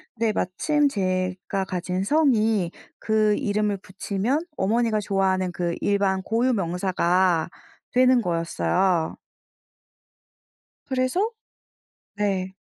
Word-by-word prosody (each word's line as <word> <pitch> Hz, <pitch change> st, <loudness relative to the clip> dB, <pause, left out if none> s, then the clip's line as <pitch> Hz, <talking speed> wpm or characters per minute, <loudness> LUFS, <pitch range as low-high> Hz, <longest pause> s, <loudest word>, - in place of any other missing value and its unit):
근데 225 Hz, -1 st, 0 dB
마침 290 Hz, -, +1 dB
제가 185 Hz, -1 st, -2 dB
가진 185 Hz, 0 st, -2 dB
성이 220 Hz, -, +2 dB, 0.3 s
그 215 Hz, -1 st, +2 dB
이름을 210 Hz, -4 st, 0 dB
붙이면 200 Hz, -, -2 dB
어머니가 225 Hz, +3 st, +1 dB
좋아하는 190 Hz, -2 st, 0 dB
그 175 Hz, -1 st, -2 dB
일반 195 Hz, -2 st, +1 dB
고유명사가 185 Hz, -6 st, +1 dB, 0.4 s
되는 255 Hz, 0 st, +4 dB
거였어요. 170 Hz, 0 st, 0 dB, 1.7 s
그래서 265 Hz, -, 0 dB, 0.9 s
네. 195 Hz, -2 st, -1 dB
195 Hz, 205 characters per minute, -24 LUFS, 185-230 Hz, 1.7 s, 되는